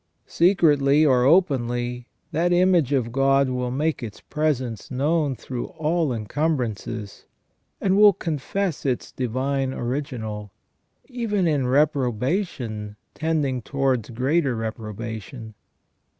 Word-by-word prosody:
Secretly 155 -5 +4
or 125 -3 +4
openly, 125 -7 +1 0.2
that 170 +2 +1
image 175 -5 +3
of 125 -5 0
God 135 +1 +3
will 125 -1 -2
make 145 +4 -1
its 110 -4 -7
presence 130 -8 -2
known 145 +1 0
through 125 +1 -5
all 160 -1 -1
encumbrances, 115 -3 -3 0.5
and 190 -1 +2
will 205 0 +8
confess 170 +1 -3
its 130 -3 -2
Divine 130 +2 -1
Original, 120 -6 -4 0.5
even 225 -7 -1
in 145 -5 +1
reprobation 125 - 0 0.2
tending 150 -5 -1
towards 130 -3 -1
greater 130 +3 +1
reprobation. 110 +1 -6
135 Hz, 105 wpm, -24 LUFS, 120-155 Hz, 0.5 s, will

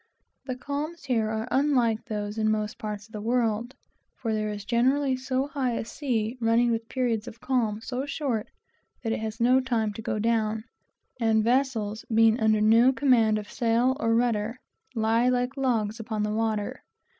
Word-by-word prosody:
The 255 - -2
calms 290 +5 -5
here 230 -6 0
are 220 +1 -3
unlike 250 -6 +2
those 210 -2 -4
in 215 0 +2
most 215 0 -1
parts 210 -3 -5
of 220 - -22
the 210 -2 -6
world, 235 +1 0 0.4
for 225 -3 -3
there 215 0 -1
is 205 -1 -6
always 260 +1 +2
such 260 - -1
a - - -5
high 260 -7 -1
sea 235 -2 -2
running, 230 +1 +3
and 230 - +2
the - - -1
periods 230 -1 -2
of 230 - -9
calm 230 -5 0
are - - -13
so 255 +4 -4
short, 275 -6 -2 0.6
that 225 - -1
it - - -2
has 220 +1 -5
no 250 +2 +5
time 225 -5 -1
to 225 - -7
go 215 - -2
down; 220 0 0 0.6
and 220 -2 +3
vessels, 230 -4 0
being 225 +1 +4
under 215 -1 +3
no 230 +4 +6
command 245 -6 +3
of 210 -1 -7
sails 240 +2 +2
or 230 -3 +2
rudder, 230 0 0 0.4
lie 225 +2 +2
like 250 +1 0
logs 230 -5 0
upon 220 -1 -3
the 210 0 -1
water. 215 -2 -1
230 Hz, 185 wpm, -27 LUFS, 215-255 Hz, 0.6 s, no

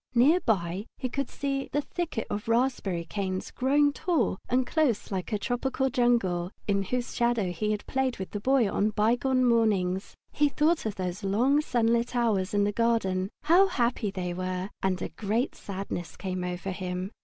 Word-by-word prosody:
Near 285 +9 +5
by 190 - -1
he 255 - -3
could 275 +3 -2
see 275 -1 -3
the 290 - +1
thicket 325 -6 -3
of 205 +1 -3
raspberry 230 -8 0
canes, 190 0 -3
growing 285 +3 +3
tall 285 - 0
and 255 +1 +2
close 275 -9 0
like 190 +1 -3
a 210 - +1
tropical 260 +4 -1
jungle, 230 -9 +2 0.2
in 200 -1 +2
whose 245 +5 -2
shadow 235 -6 +1
he 195 +5 -2
had 210 -1 -2
played 265 -1 -1
with 190 - -6
the 205 - -3
Boy 260 +1 +3
on 205 +2 +1
bygone 245 +5 +2
mornings. 205 -6 +1 0.2
He 295 0 +2
thought 305 -1 +1
of 210 - -3
those 185 +1 -4
long 245 +9 +3
sunlit 235 -3 +1
hours 210 -5 +1
in 205 - +3
the 205 - +1
garden 200 -5 +1
how 365 +5 +6
happy 240 - 0
they 180 -2 -3
were 185 +2 -3
and 190 -1 0
a - - -3
great 225 +5 -1
sadness 190 -3 -6
came 185 -1 -3
over 180 +2 -3
him. 185 +1 -4
220 Hz, 180 wpm, -28 LUFS, 190-255 Hz, 0.2 s, how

